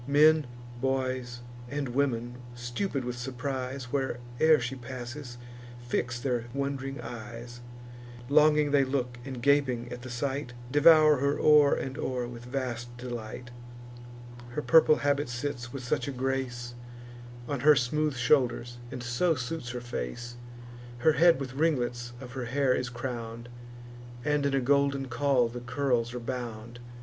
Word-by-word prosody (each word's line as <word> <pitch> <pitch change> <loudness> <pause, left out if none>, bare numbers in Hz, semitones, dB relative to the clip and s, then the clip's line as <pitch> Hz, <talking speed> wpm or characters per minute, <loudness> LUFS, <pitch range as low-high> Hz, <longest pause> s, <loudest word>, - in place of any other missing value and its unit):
Men, 150 0 +5 0.3
boys, 130 -2 -1 0.3
and 140 -1 -2
women, 120 -2 -1 0.2
stupid 120 +4 -3
with 125 0 -3
surprise, 130 0 -4
Where'er 130 +3 +2
she 120 +2 -3
passes, 125 0 -7 0.4
fix 120 0 -2
their 120 -2 -1
wond'ring 140 0 -3
eyes: 120 +1 -8 0.7
Longing 150 +1 +4
they 140 -1 +5
look, 130 -2 -2
and, 130 -2 -7
gaping 130 -4 +2
at 125 - -8
the 130 - -8
sight, 130 +1 -3 0.2
Devour 155 0 +7
her 140 +2 +1
o'er 150 -2 +6
and 135 0 -4
o'er 125 -2 -2
with 120 0 -9
vast 120 -2 -4
delight; 120 -1 -6 1.0
Her 150 - -2
purple 160 -1 +6
habit 145 -1 0
sits 120 -1 -4
with 135 -1 -6
such 125 - -1
a - - -2
grace 130 -2 -2 0.7
On 140 0 -2
her 150 +3 +7
smooth 145 +3 +1
shoulders, 120 -1 +1
and 125 -1 -6
so 125 +8 +1
suits 130 0 -4
her 125 0 -4
face; 120 - -5 0.6
Her 155 +6 +4
head 170 -1 +5
with 130 -2 -5
ringlets 120 -5 0
of 125 -1 -9
her 130 -2 -4
hair 130 +1 +2
is 125 -1 -1
crown'd, 120 -1 -6 0.8
And 150 -1 +2
in 135 - 0
a 135 - +2
golden 140 0 +2
caul 130 -1 +2
the 120 +1 -6
curls 125 -1 0
are - - -3
bound. 120 -1 -6
130 Hz, 145 wpm, -29 LUFS, 120-140 Hz, 1.0 s, Devour